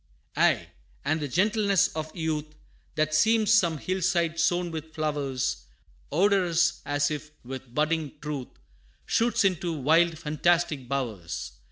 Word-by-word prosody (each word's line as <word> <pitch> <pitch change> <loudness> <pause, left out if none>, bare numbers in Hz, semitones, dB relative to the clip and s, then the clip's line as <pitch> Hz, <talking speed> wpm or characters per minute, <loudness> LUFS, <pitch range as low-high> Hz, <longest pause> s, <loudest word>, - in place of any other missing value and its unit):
Aye, - - +2 0.4
and 155 +3 +1
the 145 - -3
gentleness 200 - +2
of 155 0 -6
youth, 155 -2 -3 0.4
That 155 0 0
seems 220 +6 +4
some 170 -7 +3
hill 185 +5 -3
side 170 -2 +1
sown 175 +1 +1
with 160 0 -7
flowers, 140 - -2 0.4
Odorous, 175 -1 +2
as 145 +1 +1
if 150 0 -5 0.2
with 130 -1 -8
budding 155 -1 0
truth, 150 -4 -4 0.6
Shoots 235 -1 +2
into 180 -3 0
wild 160 +3 +3
fantastic 155 -3 0
bowers. 115 -11 -3
160 Hz, 130 wpm, -27 LUFS, 145-175 Hz, 0.6 s, seems